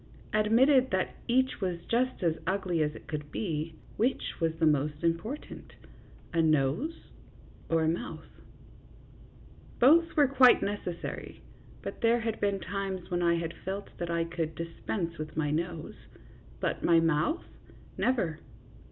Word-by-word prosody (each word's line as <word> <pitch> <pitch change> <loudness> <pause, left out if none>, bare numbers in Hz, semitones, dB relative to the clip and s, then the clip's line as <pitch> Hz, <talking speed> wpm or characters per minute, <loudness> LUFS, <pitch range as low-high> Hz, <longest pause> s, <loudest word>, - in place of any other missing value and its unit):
Admitted 250 +5 +4
that 185 -1 0
each 260 -1 +2
was 180 -3 -1
just 250 -2 0
as 165 -2 +2
ugly 185 -3 0
as 150 0 0
it - - -11
could 150 -2 -5
be, 160 -5 -3 0.2
which 245 +5 0
was 165 -1 +2
the 165 0 +1
more 150 -1 +3
important, 170 - -3 0.6
a 165 - +3
nose 155 - 0 0.6
or 165 -1 +3
a - - +2
mouth? 170 +10 -3 1.5
Both 330 +6 +5
were 290 -2 +6
quite 260 -2 +6
necessary, 200 -4 -5 0.4
but - - -6
there 235 +1 +3
had 225 -1 -2
been 200 -1 +1
times 190 0 -4
when 175 0 0
I 170 -1 +3
had 165 0 -3
felt 195 +2 -5
that 175 -1 -3
I 170 0 +1
could 165 -1 -3
dispense 170 +1 -4
with 155 0 -6
my 150 -2 +1
nose; 165 +1 -4 0.5
but - - -2
my 170 -1 +5
mouth 165 - +1 0.5
never. 180 -12 0
175 Hz, 145 wpm, -30 LUFS, 165-225 Hz, 1.5 s, were